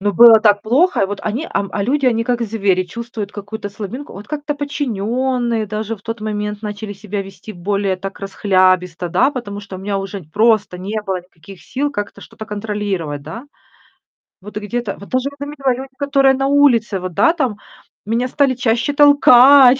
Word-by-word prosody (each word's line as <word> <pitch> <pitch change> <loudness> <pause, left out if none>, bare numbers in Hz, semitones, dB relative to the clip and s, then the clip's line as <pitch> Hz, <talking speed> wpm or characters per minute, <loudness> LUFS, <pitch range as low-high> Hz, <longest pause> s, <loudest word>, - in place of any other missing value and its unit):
Но 205 +1 0
было 225 +2 +8
так 205 -2 +4
плохо. 285 +12 +2
И - - +2
вот 205 +1 -5
они, 240 +10 -2
ам, 200 - -1
а 200 - -1
люди- 275 +5 +1
они 230 -2 +2
как 240 0 0
звери, 200 -4 +1
чувствуют 220 +1 -6
какую-то 205 +1 -6
слабинку. 215 +7 -7
Вот 200 +2 -10
как-то 295 0 -3
подчинённые 250 -4 -1
даже 215 +2 -4
в 200 - -23
тот 225 0 -5
момент 210 -1 -3
начали 210 0 -5
себя 205 0 -5
вести 195 +2 -11
более 195 +1 -1
так 195 +1 -7
расхлябисто, 185 -3 +1
да, 265 - +3
потому 220 -7 -6
что 200 -2 -9
у - - -9
меня 195 +1 -2
уже 195 0 -6
просто 210 +2 +2
не 205 +4 -3
было 190 -2 -1
никаких 180 +1 -15
сил 285 +3 -2
как-то 205 -7 -5
что-то 220 - -10
контролировать, 205 -8 -3
да. 165 - -8 1.0
Вот 210 +2 -9
где-то 210 0 -3
вот 200 - -12
даже 255 +2 0
я - - -14
заметила, 275 -2 -1
люди, 265 +2 -8
которые 275 -2 +3
на 270 +1 0
улице 245 -8 +3
вот, 185 -1 -5
да, 330 - +4
там, 260 -11 -1 0.5
меня 230 +4 0
стали 275 0 +2
чаще 245 +2 0
толкать. 280 -2 +7
215 Hz, 185 wpm, -18 LUFS, 200-255 Hz, 1.0 s, было